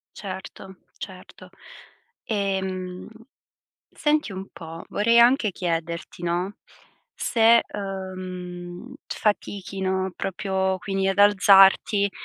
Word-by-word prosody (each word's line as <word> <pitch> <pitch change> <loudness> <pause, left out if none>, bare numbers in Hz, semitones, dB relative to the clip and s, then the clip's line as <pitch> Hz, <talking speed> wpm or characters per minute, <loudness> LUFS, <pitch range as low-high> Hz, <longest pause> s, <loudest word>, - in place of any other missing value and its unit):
Certo, 190 -1 -8 0.2
certo. - - -11 0.8
Ehm, 190 -3 -3 0.8
senti 300 -6 0
un 190 +1 -7
po', 165 0 -9
vorrei 230 +3 +3
anche 235 -3 +5
chiederti, 170 -1 -4
no, 175 +4 -2 0.6
se, 230 0 +4
uhm, 185 +1 -6
fatichi, 200 -2 -2
no, 190 0 0
proprio 190 0 -1
quindi 195 0 -1
ad 195 +1 0
alzarti, 200 0 +6
190 Hz, 90 wpm, -24 LUFS, 185-205 Hz, 0.8 s, alzarti